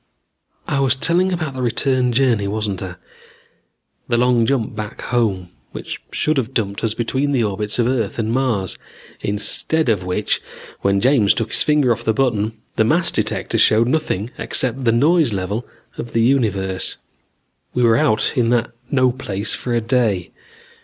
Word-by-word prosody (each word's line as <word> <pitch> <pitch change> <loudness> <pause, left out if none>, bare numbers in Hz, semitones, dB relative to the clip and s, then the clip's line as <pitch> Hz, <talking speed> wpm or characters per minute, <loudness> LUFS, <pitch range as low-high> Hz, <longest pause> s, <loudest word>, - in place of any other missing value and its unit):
"I 140 - 0
was 135 -3 +3
telling 175 +7 +2
about 160 -6 -2
the 130 - -5
return 125 +1 +1
journey, 120 -5 +2
wasn't 105 -2 -2
I? 90 -2 -6 1.1
The 120 - +1
long 120 -1 +3
jump 120 -5 0
back 105 0 -6
home, 105 -7 -1 0.2
which - - -6
should 155 -1 0
have 130 0 -2
dumped 100 -3 -1
us 110 -1 0
between 130 +5 -1
the 125 -4 +2
orbits 105 0 -2
of 120 - +2
Earth 120 -5 -1
and 110 -1 -1
Mars. 115 -7 0 0.4
Instead 120 +8 0
of 100 -5 +1
which, 90 +3 -1 0.4
when 100 0 +1
James 125 -6 +4
took 115 - -2
his - - 0
finger 150 -5 +3
off 115 - -1
the 110 - +1
button, 110 -5 +1 0.2
the - - +4
mass 170 +10 +2
detector - - -1
showed 115 +2 +4
nothing 125 -8 -1
except 130 +1 -1
the 115 - +4
noise 145 +2 +3
level 100 +5 -3 0.3
of 120 - -6
the 115 - +2
universe. 100 -7 0 0.8
"We 125 - +2
were 115 -1 +5
out 110 -2 +2
in 120 -3 +2
that 120 -1 +1 0.2
no 130 -2 +3
place 105 -5 -3
for 125 - -4
a 115 - +1
day. 110 -6 0
115 Hz, 170 wpm, -20 LUFS, 105-130 Hz, 1.1 s, were